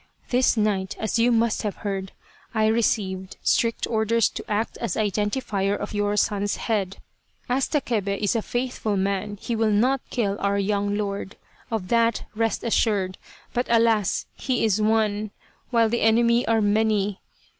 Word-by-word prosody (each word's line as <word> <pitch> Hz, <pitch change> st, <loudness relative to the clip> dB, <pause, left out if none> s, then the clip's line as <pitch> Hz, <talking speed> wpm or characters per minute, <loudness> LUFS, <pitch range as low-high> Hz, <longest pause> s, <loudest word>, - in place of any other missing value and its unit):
This 250 Hz, -1 st, +3 dB
night, 200 Hz, -3 st, 0 dB
as 220 Hz, +1 st, -1 dB
you 240 Hz, +2 st, +4 dB
must 230 Hz, -1 st, +2 dB
have 210 Hz, -2 st, -3 dB
heard, 195 Hz, -1 st, -3 dB, 0.4 s
I 220 Hz, 0 st, +3 dB
received 200 Hz, -4 st, 0 dB
strict 230 Hz, -1 st, +1 dB
orders 220 Hz, 0 st, +2 dB
to -, -, -7 dB
act 215 Hz, +2 st, -1 dB
as 230 Hz, -7 st, -2 dB
identifier 205 Hz, -1 st, 0 dB
of 205 Hz, -, -6 dB
your 205 Hz, 0 st, 0 dB
son's 205 Hz, 0 st, +1 dB
head. 200 Hz, -4 st, -2 dB, 0.5 s
As 255 Hz, +2 st, +1 dB
Takebe 215 Hz, -, -1 dB
is 205 Hz, +3 st, 0 dB
a 225 Hz, -, +1 dB
faithful 240 Hz, -3 st, -2 dB
man 200 Hz, +2 st, -1 dB
he 235 Hz, -, -3 dB
will 220 Hz, -1 st, +2 dB
not 245 Hz, +6 st, +2 dB
kill 205 Hz, -5 st, -1 dB
our 200 Hz, 0 st, +1 dB
young 205 Hz, 0 st, 0 dB
lord, 200 Hz, -1 st, -3 dB, 0.3 s
of 215 Hz, -5 st, -3 dB
that 230 Hz, -1 st, +2 dB
rest 225 Hz, +1 st, -1 dB
assured. 205 Hz, -5 st, +1 dB, 0.3 s
But 245 Hz, +1 st, 0 dB
alas! 225 Hz, -4 st, +2 dB
he 255 Hz, -4 st, -1 dB
is 215 Hz, -1 st, +2 dB
one, 215 Hz, -1 st, +1 dB, 0.4 s
while 230 Hz, -2 st, +3 dB
the 235 Hz, +2 st, -1 dB
enemy 235 Hz, +2 st, +3 dB
are 225 Hz, -1 st, +3 dB
many. 210 Hz, -1 st, +1 dB
215 Hz, 155 wpm, -24 LUFS, 200-230 Hz, 0.5 s, you